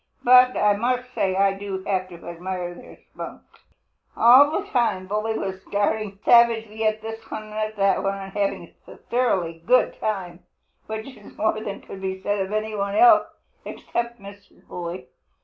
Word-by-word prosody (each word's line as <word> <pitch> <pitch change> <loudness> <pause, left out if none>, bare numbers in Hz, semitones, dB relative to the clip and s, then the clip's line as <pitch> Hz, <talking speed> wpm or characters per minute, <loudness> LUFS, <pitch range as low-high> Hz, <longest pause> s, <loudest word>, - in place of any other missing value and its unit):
But 250 +1 +6
I 210 0 +4
must 250 +2 -1
say 190 -5 0
I 195 0 +3
do 195 -1 -6
have 185 -2 -1
to 170 -1 -12
admire 175 +1 -5
their - - -14
spunk." - - -10 0.7
All 255 +5 +7
the 380 +6 -2
time 215 -7 0
Bully 215 +3 -2
was 190 -1 -5
darting 205 0 -1
savagely 225 -2 +4
at 215 0 -1
this 225 0 -8
one 215 0 -7
and 215 0 -2
that 195 -2 +2
one 195 0 -1
and 195 -1 -9
having 200 -1 -2
a - - -12
thoroughly 185 -10 -1
good 250 +6 +3
time, 185 -5 -3 0.5
which 220 0 -5
is 205 - -16
more 220 0 0
than 200 -2 -6
could 190 - -10
be 190 0 -3
said 205 +1 -1
of 190 0 -3
any 215 +1 -2
one 200 0 -2
else, 350 +1 +6 0.4
except 235 0 -4
Mrs. 200 0 -15
Bully. 175 0 -6
205 Hz, 170 wpm, -23 LUFS, 190-225 Hz, 0.7 s, All